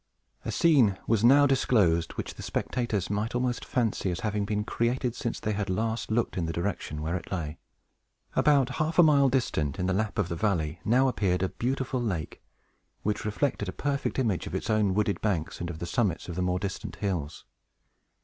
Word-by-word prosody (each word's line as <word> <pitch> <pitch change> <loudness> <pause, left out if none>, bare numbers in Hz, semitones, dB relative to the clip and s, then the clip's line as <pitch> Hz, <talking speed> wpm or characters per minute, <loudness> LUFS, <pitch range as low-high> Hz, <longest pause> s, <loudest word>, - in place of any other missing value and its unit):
A - - -3
scene 130 - +4
was 110 -2 +1
now 140 +4 +7
disclosed 100 -11 +2
which - - -5
the - - -10
spectators 110 -7 -2
might 105 +3 -1
almost 125 0 0
fancy 115 -6 0
as 85 -2 -3
having 105 -1 -1
been 105 0 -1
created 120 +2 0
since 115 - -3
they 110 - -2
had 100 -1 -2
last 110 +4 -1
looked 115 -1 0
in 85 - -1
the - - -1
direction 85 -4 -3
where 80 +3 -1
it 85 - -6
lay. 80 -4 -3 0.8
About 140 -4 +4
half 160 +1 -1
a 175 - +9
mile 140 -3 +5
distant, 80 - 0
in 90 - -1
the 95 - +1
lap 105 +2 -1
of 105 -5 +1
the 85 - -3
valley, 85 -4 0
now 130 +4 +4
appeared 95 -7 +1
a 95 - +1
beautiful 130 +1 -2
lake, 95 -9 -3 0.6
which 105 0 -1
reflected 105 -2 -1
a - - -2
perfect 140 +6 -2
image 110 -9 0
of - - -5
its - - -2
own 105 -3 +2
wooded 105 -1 0
banks, 90 -7 -1
and 85 - -3
of 85 - -5
the 85 - -4
summits 100 -4 0
of 90 - -5
the 90 - -1
more 90 0 +1
distant 95 +1 -5
hills. 85 -7 -3
105 Hz, 200 wpm, -28 LUFS, 90-120 Hz, 0.8 s, a